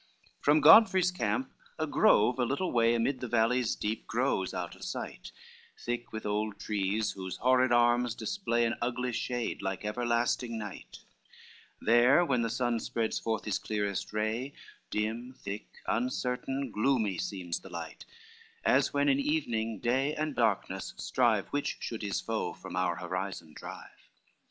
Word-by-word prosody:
II -, -, -27 dB
From 150 Hz, +1 st, +4 dB
Godfrey's 185 Hz, +2 st, +7 dB
camp 260 Hz, +8 st, -1 dB, 0.3 s
a 155 Hz, -, 0 dB
grove 125 Hz, -4 st, +4 dB
a -, -, +3 dB
little 140 Hz, +9 st, -1 dB
way 115 Hz, 0 st, +3 dB
Amid 125 Hz, +3 st, 0 dB
the 125 Hz, -, -4 dB
valleys 120 Hz, +1 st, +2 dB
deep 110 Hz, +1 st, -3 dB
grows 120 Hz, -5 st, 0 dB
out -, -, -5 dB
of -, -, -13 dB
sight, -, -, -6 dB, 0.5 s
Thick 120 Hz, 0 st, -4 dB
with 110 Hz, -1 st, -6 dB
old 105 Hz, 0 st, -1 dB
trees 105 Hz, +1 st, -1 dB
whose 95 Hz, -1 st, -6 dB
horrid 130 Hz, 0 st, +3 dB
arms 120 Hz, 0 st, +3 dB
display 120 Hz, -, 0 dB
An 115 Hz, -, 0 dB
ugly 125 Hz, +1 st, -1 dB
shade, 120 Hz, 0 st, -2 dB
like 95 Hz, +1 st, -3 dB
everlasting 120 Hz, +1 st, 0 dB
night; 105 Hz, -3 st, -8 dB, 0.8 s
There 120 Hz, +9 st, +5 dB
when 125 Hz, -6 st, +1 dB
the 115 Hz, -, 0 dB
sun 120 Hz, 0 st, 0 dB
spreads 110 Hz, 0 st, -2 dB
forth 110 Hz, -1 st, -2 dB
his 105 Hz, -, 0 dB
clearest 105 Hz, -2 st, -2 dB
ray, 110 Hz, +6 st, -2 dB, 0.4 s
Dim, 115 Hz, +4 st, -2 dB
thick, 100 Hz, -2 st, -6 dB, 0.2 s
uncertain, 125 Hz, +2 st, -1 dB
gloomy 110 Hz, -5 st, +1 dB
seems 90 Hz, -4 st, -3 dB
the 95 Hz, -, -12 dB
light; 85 Hz, -2 st, -7 dB, 0.6 s
As -, -, +4 dB
when 140 Hz, 0 st, +1 dB
in 140 Hz, -1 st, +4 dB
evening, 120 Hz, -7 st, -1 dB
day 135 Hz, +6 st, +1 dB
and 155 Hz, -1 st, -2 dB
darkness 95 Hz, -5 st, 0 dB
strive -, -, +2 dB
Which 145 Hz, 0 st, -2 dB
should 115 Hz, -, -5 dB
his 100 Hz, -2 st, -1 dB
foe -, -, -2 dB
from -, -, -9 dB
our 90 Hz, -1 st, +1 dB
horizon 90 Hz, -2 st, -5 dB
drive. -, -, -11 dB
120 Hz, 155 wpm, -30 LUFS, 105-130 Hz, 0.8 s, Godfrey's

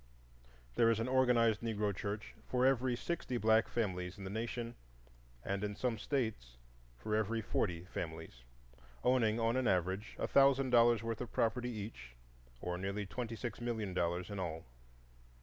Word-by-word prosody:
There 115 Hz, -, +4 dB
is 115 Hz, -1 st, +2 dB
an 115 Hz, -, -1 dB
organized 125 Hz, -4 st, +3 dB
Negro 105 Hz, -3 st, -1 dB
church 105 Hz, +3 st, -4 dB
for 125 Hz, 0 st, +2 dB
every 130 Hz, -2 st, +3 dB
sixty 130 Hz, -2 st, -3 dB
black 110 Hz, +1 st, +4 dB
families 90 Hz, -4 st, -2 dB
in 100 Hz, -, -8 dB
the 95 Hz, -, -5 dB
nation, 115 Hz, +2 st, -3 dB, 0.7 s
and 100 Hz, +1 st, -1 dB
in 105 Hz, 0 st, -2 dB
some 120 Hz, -2 st, -1 dB
States 110 Hz, -, -2 dB, 0.4 s
for 105 Hz, -, -2 dB
every 110 Hz, +1 st, +1 dB
forty 90 Hz, -5 st, -1 dB
families, 80 Hz, -8 st, -6 dB, 0.6 s
owning, 120 Hz, -3 st, +3 dB
on 115 Hz, +1 st, +2 dB
an 130 Hz, -2 st, +1 dB
average, 95 Hz, +2 st, 0 dB
a -, -, -1 dB
thousand 135 Hz, -1 st, +4 dB
dollars' 120 Hz, -1 st, +5 dB
worth 115 Hz, 0 st, -3 dB
of 125 Hz, -, -5 dB
property 125 Hz, +2 st, +1 dB
each, 105 Hz, -, -7 dB, 0.5 s
or 90 Hz, 0 st, -3 dB
nearly 100 Hz, +2 st, -2 dB
twenty 115 Hz, +3 st, -4 dB
six 120 Hz, 0 st, -5 dB
million 110 Hz, -5 st, -2 dB
dollars 90 Hz, +2 st, -1 dB
in 100 Hz, -, -4 dB
all. 80 Hz, -3 st, -4 dB
110 Hz, 160 wpm, -35 LUFS, 95-120 Hz, 0.7 s, dollars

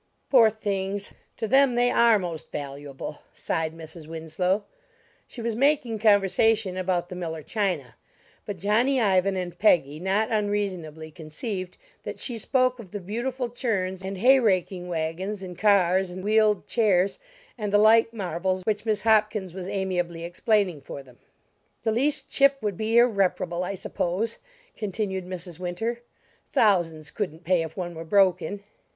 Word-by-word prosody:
"Poor 235 Hz, -5 st, +7 dB
things, 200 Hz, -2 st, -3 dB, 0.3 s
to 225 Hz, -, -2 dB
them 265 Hz, +1 st, +4 dB
they 245 Hz, 0 st, +3 dB
are 235 Hz, -2 st, +5 dB
most 175 Hz, -5 st, -6 dB
valuable!" 140 Hz, 0 st, -6 dB
sighed 160 Hz, -1 st, -2 dB
Mrs. 160 Hz, -1 st, -10 dB
Winslow. 165 Hz, +5 st, -1 dB, 0.6 s
She 235 Hz, -, -8 dB
was 230 Hz, -1 st, -1 dB
making 255 Hz, -4 st, +1 dB
conversation 205 Hz, -1 st, +3 dB
about 180 Hz, -2 st, -1 dB
the 180 Hz, -, -8 dB
Miller 160 Hz, -3 st, -5 dB
china; 200 Hz, -2 st, -2 dB, 0.5 s
but 205 Hz, -3 st, -6 dB
Johnny 230 Hz, +9 st, +2 dB
Ivan 195 Hz, -3 st, +2 dB
and 180 Hz, -2 st, -4 dB
Peggy 155 Hz, -8 st, +3 dB
not 195 Hz, +5 st, 0 dB
unreasonably 190 Hz, -7 st, -2 dB
conceived 180 Hz, -, -6 dB, 0.2 s
that -, -, -6 dB
she 240 Hz, -3 st, -4 dB
spoke 255 Hz, +2 st, +1 dB
of 210 Hz, -5 st, -10 dB
the 205 Hz, -, -5 dB
beautiful 240 Hz, +7 st, -3 dB
churns 200 Hz, -7 st, -2 dB
and 190 Hz, 0 st, -5 dB
hayraking 195 Hz, -6 st, +3 dB
wagons 175 Hz, +4 st, -3 dB
and 180 Hz, -1 st, -7 dB
cars 190 Hz, -1 st, +3 dB
and 185 Hz, +1 st, -7 dB
wheeled 215 Hz, 0 st, +3 dB
chairs 200 Hz, -5 st, +2 dB, 0.4 s
and 210 Hz, -4 st, -3 dB
the 205 Hz, -, +5 dB
like 225 Hz, +2 st, +5 dB
marvels 185 Hz, -3 st, -2 dB
which 215 Hz, +1 st, -1 dB
Miss 215 Hz, -1 st, 0 dB
Hopkins 215 Hz, -4 st, +2 dB
was 185 Hz, -1 st, -6 dB
amiably 180 Hz, -4 st, -2 dB
explaining 180 Hz, -1 st, 0 dB
for 140 Hz, 0 st, -8 dB
them. 125 Hz, -2 st, -19 dB, 0.6 s
"The 220 Hz, -, +1 dB
least 275 Hz, +7 st, 0 dB
chip 275 Hz, 0 st, +3 dB
would 205 Hz, -3 st, -1 dB
be 220 Hz, +4 st, 0 dB
irreparable, 190 Hz, -6 st, +2 dB
I 195 Hz, +2 st, -3 dB
suppose," 190 Hz, +5 st, -2 dB, 0.4 s
continued 195 Hz, -3 st, -3 dB
Mrs. 180 Hz, -2 st, -7 dB
Winter, 225 Hz, +7 st, -3 dB, 0.5 s
"thousands 165 Hz, -8 st, +2 dB
couldn't 170 Hz, -5 st, -4 dB
pay 175 Hz, 0 st, +2 dB
if 160 Hz, -1 st, -6 dB
one 175 Hz, -2 st, -4 dB
were 165 Hz, 0 st, -7 dB
broken!" 190 Hz, +1 st, +2 dB
195 Hz, 150 wpm, -25 LUFS, 175-220 Hz, 0.6 s, Poor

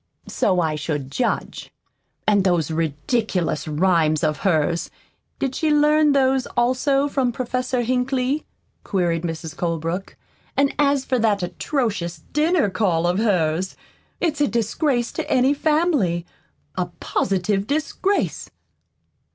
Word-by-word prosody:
"So 185 Hz, -3 st, +1 dB
I 160 Hz, -3 st, +1 dB
should 145 Hz, -3 st, -3 dB
judge. 245 Hz, -, -2 dB, 0.6 s
And 205 Hz, -2 st, +4 dB
those 175 Hz, -5 st, +1 dB
ridiculous 160 Hz, -, -1 dB
rhymes 155 Hz, -1 st, +2 dB
of 155 Hz, -1 st, +1 dB
hers 170 Hz, -3 st, +1 dB, 0.5 s
did 270 Hz, -1 st, -2 dB
she 315 Hz, +3 st, 0 dB
learn 300 Hz, 0 st, +4 dB
those, 265 Hz, -1 st, +2 dB
also, 265 Hz, +3 st, +2 dB
from 270 Hz, -3 st, 0 dB
Professor 255 Hz, +1 st, -2 dB
Hinkley?" 255 Hz, +3 st, 0 dB, 0.4 s
queried 175 Hz, -4 st, 0 dB
Mrs. 165 Hz, -1 st, -5 dB
Colebrook. 165 Hz, +2 st, -3 dB, 0.4 s
"And 275 Hz, 0 st, +3 dB
as 280 Hz, -2 st, +2 dB
for 255 Hz, -2 st, 0 dB
that 210 Hz, -4 st, +2 dB
atrocious 175 Hz, -, -2 dB
dinner 310 Hz, -, +3 dB
call 185 Hz, -4 st, +1 dB
of 175 Hz, +3 st, +1 dB
hers, 185 Hz, -4 st, +1 dB, 0.4 s
it's 310 Hz, -4 st, 0 dB
a 290 Hz, -, +4 dB
disgrace 240 Hz, +2 st, 0 dB
to -, -, -5 dB
any 260 Hz, +2 st, +4 dB
family 290 Hz, -, +1 dB, 0.5 s
a 180 Hz, -, -1 dB
positive 195 Hz, +1 st, 0 dB
disgrace!" 315 Hz, +7 st, -1 dB
210 Hz, 120 wpm, -22 LUFS, 170-270 Hz, 0.6 s, And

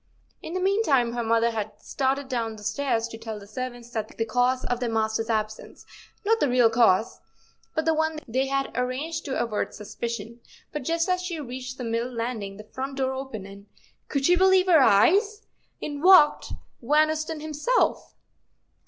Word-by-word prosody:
In 335 Hz, -, -7 dB
the -, -, 0 dB
meantime 365 Hz, -, +2 dB
her 240 Hz, -, -2 dB
mother 230 Hz, +1 st, +2 dB
had 215 Hz, -1 st, -5 dB
started 270 Hz, +2 st, -1 dB
down 230 Hz, -4 st, -3 dB
stairs 225 Hz, +2 st, -1 dB
to 225 Hz, -, -9 dB
tell 225 Hz, -1 st, -6 dB
the 200 Hz, -, -12 dB
servants 240 Hz, +2 st, -7 dB
the 220 Hz, -2 st, -1 dB, 0.2 s
cause 250 Hz, +3 st, +1 dB
of 245 Hz, -, -1 dB
their 245 Hz, -1 st, -1 dB
master's 220 Hz, 0 st, -1 dB
absence—not 225 Hz, -, -3 dB
the 290 Hz, -, +2 dB
real 245 Hz, -2 st, +4 dB
cause, 225 Hz, -2 st, +3 dB, 0.6 s
but 315 Hz, -, 0 dB
the 320 Hz, -, +3 dB
one 315 Hz, 0 st, 0 dB
they 260 Hz, +4 st, 0 dB
had 275 Hz, 0 st, -1 dB
arranged 275 Hz, +6 st, -2 dB
to 270 Hz, -, -2 dB
avert 225 Hz, -3 st, -2 dB
suspicion—but 235 Hz, +6 st, -7 dB
just 330 Hz, +6 st, 0 dB
as 365 Hz, 0 st, +1 dB
she 355 Hz, -3 st, -4 dB
reached 255 Hz, -1 st, -6 dB
the 250 Hz, -, -5 dB
middle 230 Hz, +2 st, -2 dB
landing, 230 Hz, -4 st, -4 dB
the 210 Hz, -, -9 dB
front 265 Hz, +5 st, -6 dB
door 265 Hz, -1 st, 0 dB
opened 260 Hz, -7 st, -6 dB
and—could 200 Hz, +7 st, -7 dB
she 355 Hz, -, +5 dB
believe 375 Hz, 0 st, +4 dB
her 350 Hz, -4 st, +6 dB
eyes!—in 325 Hz, -, +1 dB
walked 350 Hz, -4 st, +6 dB, 0.3 s
Van 305 Hz, +5 st, +3 dB
Ousten 315 Hz, 0 st, -3 dB
himself. 310 Hz, -, 0 dB
255 Hz, 160 wpm, -25 LUFS, 225-310 Hz, 0.6 s, her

